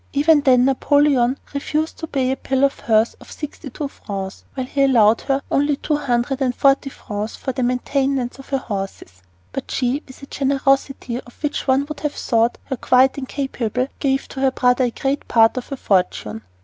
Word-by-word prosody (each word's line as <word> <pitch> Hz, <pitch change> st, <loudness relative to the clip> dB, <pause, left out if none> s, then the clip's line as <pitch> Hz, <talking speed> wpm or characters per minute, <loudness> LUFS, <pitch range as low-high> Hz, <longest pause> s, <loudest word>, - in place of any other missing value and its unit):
Even 295 Hz, +2 st, +4 dB
then 255 Hz, -3 st, +5 dB
Napoleon 270 Hz, -1 st, +3 dB, 0.2 s
refused 305 Hz, +2 st, -2 dB
to 320 Hz, -, -5 dB
pay 265 Hz, -3 st, 0 dB
a -, -, 0 dB
bill 270 Hz, 0 st, -1 dB
of 275 Hz, 0 st, +2 dB
hers 220 Hz, 0 st, +2 dB
for -, -, -15 dB
sixty 300 Hz, -2 st, -7 dB
two 285 Hz, +4 st, -4 dB
francs, 195 Hz, -7 st, -7 dB
while 260 Hz, -2 st, -2 dB
he 275 Hz, +2 st, -1 dB
allowed 230 Hz, -5 st, +5 dB
her 275 Hz, 0 st, -1 dB
only 290 Hz, +1 st, +2 dB
two 300 Hz, +2 st, -1 dB
hundred 265 Hz, -1 st, -1 dB
and 250 Hz, -2 st, +1 dB
forty 275 Hz, 0 st, +3 dB
francs 210 Hz, -4 st, -5 dB
for 265 Hz, -, -4 dB
the 255 Hz, -, -3 dB
maintenance 255 Hz, +1 st, 0 dB
of 270 Hz, -, -12 dB
her 275 Hz, -, +1 dB
horses. 195 Hz, -, -6 dB, 0.3 s
But 270 Hz, -, -5 dB
she, 260 Hz, +3 st, 0 dB
with 260 Hz, +1 st, -14 dB
a -, -, -5 dB
generosity 275 Hz, -2 st, 0 dB
of 240 Hz, +5 st, -19 dB
which 295 Hz, -1 st, -2 dB
one 265 Hz, +1 st, +3 dB
would 305 Hz, 0 st, -7 dB
have 300 Hz, -1 st, -2 dB
thought 230 Hz, 0 st, +1 dB
her 265 Hz, -, -4 dB
quite 260 Hz, +3 st, +3 dB
incapable, 260 Hz, -2 st, -2 dB
gave 270 Hz, -1 st, 0 dB
to 270 Hz, -, -7 dB
her 265 Hz, 0 st, +3 dB
brother 250 Hz, 0 st, +2 dB
a -, -, +1 dB
great 270 Hz, +4 st, -2 dB
part 225 Hz, -1 st, +4 dB
of 255 Hz, -, -4 dB
her 275 Hz, -, -5 dB
fortune. 180 Hz, -, 0 dB
265 Hz, 195 wpm, -21 LUFS, 240-280 Hz, 0.3 s, then